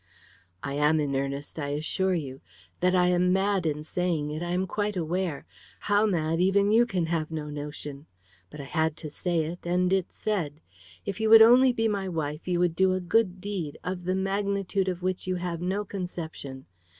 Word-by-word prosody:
"I 140 Hz, -, -3 dB
am 150 Hz, +2 st, +3 dB
in 140 Hz, -2 st, -1 dB
earnest, 140 Hz, +3 st, -3 dB
I 145 Hz, -, -2 dB
assure 180 Hz, +6 st, 0 dB
you. 135 Hz, -5 st, -5 dB, 0.4 s
That 180 Hz, +1 st, +2 dB
I 180 Hz, -1 st, +4 dB
am 180 Hz, 0 st, +3 dB
mad 195 Hz, -2 st, +1 dB
in 150 Hz, 0 st, -2 dB
saying 160 Hz, -3 st, -1 dB
it, 155 Hz, +2 st, -4 dB
I 175 Hz, -, -3 dB
am 180 Hz, +2 st, 0 dB
quite 205 Hz, +1 st, -2 dB
aware; 170 Hz, -2 st, -2 dB, 0.4 s
how 205 Hz, +1 st, +3 dB
mad, 165 Hz, -3 st, 0 dB
even 200 Hz, +2 st, +3 dB
you 235 Hz, +2 st, +5 dB
can 180 Hz, -6 st, 0 dB
have 160 Hz, -2 st, -1 dB
no 155 Hz, -2 st, -5 dB
notion. 145 Hz, 0 st, -7 dB, 0.4 s
But 150 Hz, -, -11 dB
I -, -, -5 dB
had 160 Hz, +2 st, -1 dB
to 155 Hz, -3 st, -7 dB
say 170 Hz, +1 st, 0 dB
it, 170 Hz, +3 st, -5 dB
and 180 Hz, +1 st, +1 dB
it's 190 Hz, -2 st, -1 dB
said. 170 Hz, -9 st, -2 dB, 0.5 s
If 195 Hz, -, -4 dB
you 220 Hz, 0 st, +1 dB
would 225 Hz, 0 st, +10 dB
only 250 Hz, +3 st, +7 dB
be 225 Hz, -2 st, 0 dB
my 200 Hz, -3 st, -1 dB
wife, 155 Hz, -2 st, -4 dB
you 175 Hz, -1 st, +1 dB
would 175 Hz, -2 st, +2 dB
do 190 Hz, +1 st, +3 dB
a 185 Hz, -, 0 dB
good 185 Hz, +1 st, +1 dB
deed, 185 Hz, -7 st, -4 dB
of 180 Hz, -1 st, -4 dB
the 185 Hz, +1 st, 0 dB
magnitude 195 Hz, 0 st, -1 dB
of 180 Hz, -1 st, -3 dB
which 185 Hz, 0 st, -2 dB
you 185 Hz, -, 0 dB
have 175 Hz, -2 st, -3 dB
no 195 Hz, +3 st, -1 dB
conception. 165 Hz, -8 st, -6 dB
180 Hz, 200 wpm, -27 LUFS, 155-190 Hz, 0.5 s, would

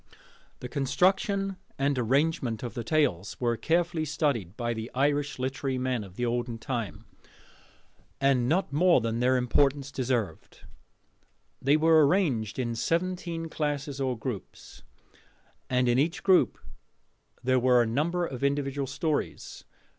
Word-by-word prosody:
The 125 Hz, -, -5 dB
construction 190 Hz, +8 st, +1 dB, 0.2 s
and 140 Hz, +1 st, +1 dB
arrangement 130 Hz, -2 st, 0 dB
of 120 Hz, -, -5 dB
the 120 Hz, -, -4 dB
tales 115 Hz, -, 0 dB
were 120 Hz, -1 st, +1 dB
carefully 170 Hz, +4 st, 0 dB
studied 140 Hz, -, -1 dB
by 120 Hz, -1 st, -1 dB
the 110 Hz, +1 st, -5 dB
Irish 145 Hz, +2 st, +1 dB
literary 130 Hz, +1 st, -2 dB
men 125 Hz, -3 st, -1 dB
of 95 Hz, -2 st, -13 dB
the 120 Hz, -, -1 dB
olden 120 Hz, 0 st, -2 dB
time, 115 Hz, -4 st, -4 dB, 1.1 s
and 135 Hz, -3 st, +2 dB
not 170 Hz, -2 st, +1 dB
more 175 Hz, +4 st, +5 dB
than 115 Hz, 0 st, -2 dB
their 130 Hz, +1 st, +3 dB
importance 135 Hz, +3 st, +1 dB
deserved. 125 Hz, -6 st, -3 dB, 1.0 s
They 140 Hz, +3 st, +4 dB
were 160 Hz, 0 st, +5 dB
arranged 135 Hz, -, 0 dB
in 120 Hz, -3 st, -1 dB
seventeen 170 Hz, +4 st, -2 dB
classes 145 Hz, -3 st, -3 dB
or 130 Hz, -2 st, -1 dB
groups, 110 Hz, -3 st, -7 dB, 0.9 s
and 125 Hz, 0 st, +2 dB
in 120 Hz, +1 st, +3 dB
each 165 Hz, +5 st, 0 dB
group 190 Hz, -2 st, +4 dB, 0.9 s
there 130 Hz, 0 st, +3 dB
were 125 Hz, -1 st, +4 dB
a -, -, -1 dB
number 160 Hz, +10 st, 0 dB
of 135 Hz, -4 st, -6 dB
individual 140 Hz, -1 st, 0 dB
stories. 150 Hz, +3 st, -3 dB
135 Hz, 135 wpm, -28 LUFS, 120-155 Hz, 1.1 s, more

